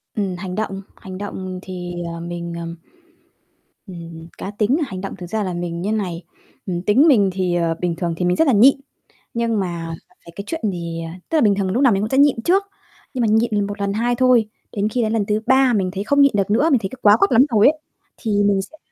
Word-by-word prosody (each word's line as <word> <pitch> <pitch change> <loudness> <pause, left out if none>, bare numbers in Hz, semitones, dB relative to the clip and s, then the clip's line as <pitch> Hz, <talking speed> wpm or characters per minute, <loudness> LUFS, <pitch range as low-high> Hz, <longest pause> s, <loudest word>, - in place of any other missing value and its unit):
Ừm, 195 -4 -2
hành 185 0 -6
động, 195 -3 -3
hành 185 -1 -9
động 185 -2 -6
thì, 180 -2 -7 0.2
ờ, 170 - -7
mình, 170 0 -6
ờm, 170 0 -6 1.1
ừm, 165 -2 -9
cá 195 - -6
tính 210 +6 +1
là - - 0
hành 185 -4 -6
động 195 - -6
thực 175 -1 -8
ra 215 0 -1
là 185 - -3
mình 175 -1 -4
như 205 +4 -1
này, 185 -5 -3 0.4
ừm, 175 -3 -3
tính 230 - +4
mình 205 -9 +5
thì 180 -2 -1
ờ, 165 -1 0
bình 175 -2 -1
thường 170 -1 -2
thì 180 - -1
mình 180 - +2
rất 320 - +2
là 265 - +4
nhịn, 240 +6 +6 0.6
nhưng 230 -2 0
mà 170 -3 -4 0.3
về 170 - -12
cái 200 - -6
chuyện 325 -1 -4
thì 170 -2 -5
ờ, 165 - -7 0.2
tức - - -1
là - - +3
bình 205 -3 +4
thường 195 -1 -1
mình 185 - -2
lúc 255 - +1
nào 255 - +6
mình 195 - 0
cũng 215 - -2
sẽ 265 - 0
nhịn 280 -5 +4
trước, 385 +3 +3 0.5
nhưng 255 - -2
mà 230 - +2
nhịn 220 +2 +2
lần 205 -1 0
1, 205 +1 -6
lần 200 0 -1
2 240 +3 0
thôi, 245 -3 +3 0.2
đến 205 0 -1
khi 245 +3 -1
đến 220 -1 0
lần 215 -3 +1
thứ 210 +1 0
3 265 -1 +4
mình 190 -4 0
thấy 195 - -3
không 285 +6 +3
nhịn 280 -1 +6
được 200 -1 0
nữa, 285 +10 +3
mình 260 - +4
thấy 190 - -3
c 260 +3 -12
quá 205 +1 +6
quắt 395 - +2
lắm 250 +4 +6
rồi 215 -2 +5
ấy, 310 +2 +2 0.4
thì 205 -4 0
mình 200 -1 +2
sẽ 260 +11 -12
205 Hz, 265 wpm, -20 LUFS, 180-230 Hz, 1.1 s, nhịn